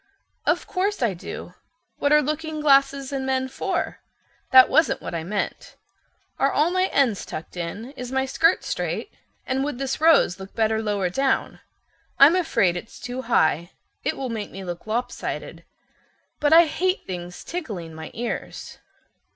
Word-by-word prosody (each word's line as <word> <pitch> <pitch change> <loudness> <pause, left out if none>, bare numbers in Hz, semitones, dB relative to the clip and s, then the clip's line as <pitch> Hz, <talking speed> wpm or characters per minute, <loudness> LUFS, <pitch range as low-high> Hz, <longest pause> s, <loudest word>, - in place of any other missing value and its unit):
"Of - - +2
course 390 -4 -1
I 225 -5 +2
do. 175 - -8 0.5
What 285 - +1
are 300 0 +6
looking 310 +2 -3
glasses 275 -1 +3
and 270 -1 -2
men 260 0 0
for? 260 - -3 0.5
That 260 0 +9
wasn't 315 0 +3
what - - -7
I 165 -1 -3
meant. 200 +4 -4 0.6
Are - - +3
all 315 +4 +2
my 370 +1 +2
ends 255 - +1
tucked 160 - -8
in? 190 +8 -5
Is 250 -3 -7
my 265 0 +1
skirt 325 +6 +2
straight? - - -3 0.3
And 265 +1 0
would 290 -3 -3
this 270 +2 -3
rose 315 - +5
look 190 0 -10
better 220 -1 +1
lower 205 -4 -1
down? 270 +7 0 0.6
I'm 290 +5 +8
afraid 260 - +2
it's 195 +6 -8
too 250 +1 -5
high—it 170 - -1
will 265 -2 -3
make 220 -3 -4
me 195 - -8
look 175 -1 -6
lop 230 +3 -1
sided. - - -6 0.7
But 295 0 +2
I 335 +1 +8
hate 370 +4 -1
things 175 -1 -7
tickling 210 - -6
my 160 0 -8
ears." 240 +1 -5
260 Hz, 160 wpm, -24 LUFS, 200-295 Hz, 0.7 s, That